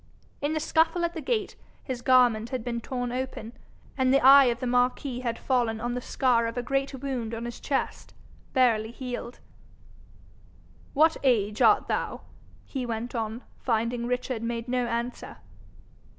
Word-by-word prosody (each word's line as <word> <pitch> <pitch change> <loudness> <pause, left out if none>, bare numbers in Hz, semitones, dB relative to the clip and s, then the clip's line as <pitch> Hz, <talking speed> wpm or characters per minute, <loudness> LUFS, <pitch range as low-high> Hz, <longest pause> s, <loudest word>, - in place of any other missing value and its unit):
In 290 +2 0
the 310 - 0
scuffle 325 +2 +2
at 340 - -3
the 320 - -5
gate, 430 +1 -1 0.3
his 255 -3 -5
garment 245 -3 +4
had 255 -3 -3
been 235 -1 -3
torn 245 0 -3
open, 250 -3 -5 0.4
and 260 -1 +2
the 275 - +5
eye 275 +1 +9
of 240 -1 0
the 255 - -3
marquis 250 +1 0
had 235 -2 -2
fallen 240 -4 0
on 240 +2 -2
the 250 - -3
scar 245 -2 +1
of 230 +1 -5
a 245 - -1
great 275 +2 -1
wound 250 -4 -4
on 230 +1 -5
his 240 -1 -6
chest, 275 - -3 0.4
barely 230 -5 +3
healed. 245 0 -6 1.6
'What 315 +3 +4
age 215 -6 +1
art - - +5
thou?' - - -2 0.4
he 265 -3 -4
went 235 0 -4
on, 225 0 -3 0.2
finding 235 0 -1
Richard 250 -1 -2
made 230 0 -3
no 250 -1 0
answer. 235 +1 -4
245 Hz, 165 wpm, -27 LUFS, 235-265 Hz, 1.6 s, eye